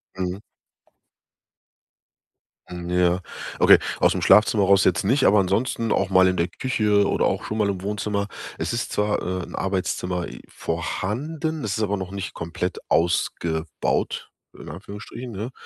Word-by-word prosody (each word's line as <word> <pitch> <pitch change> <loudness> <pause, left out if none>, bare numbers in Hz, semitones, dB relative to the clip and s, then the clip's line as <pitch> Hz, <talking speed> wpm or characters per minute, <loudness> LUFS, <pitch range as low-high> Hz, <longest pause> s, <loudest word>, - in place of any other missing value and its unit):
Mhm. 95 +1 -3 2.3
M 90 0 -6
Ja, 90 0 +2 0.4
okay, - - +8 0.2
aus - - +4
dem - - -1
Schlafzimmer 100 +1 +5
raus 100 0 +5
jetzt 90 - +2
nicht, 130 +6 +3
aber 105 0 +6
ansonsten 110 +4 0
auch 100 - +1
mal 95 -1 +5
in 90 - +1
der 85 - +1
Küche 105 -4 +1
oder - - +1
auch - - -1
schon 110 - -3
mal 105 -2 +2
im 95 -2 -3
Wohnzimmer. 100 0 -2 0.3
Es - - -2
ist 115 - -2
zwar, 105 0 0
äh, 90 0 -3
'n - - -9
Arbeitszimmer 90 -2 -2 0.2
vorhanden, 145 - -3
es 105 -3 -2
ist 110 - 0
aber 105 0 0
noch 95 -1 -6
nicht 100 -2 -5
komplett 85 +2 -4
ausgebaut, 85 -2 0 0.3
in - - -10
Anführungsstrichen, 105 +8 -8
ne? 110 +5 -5
95 Hz, 155 wpm, -23 LUFS, 90-105 Hz, 2.3 s, okay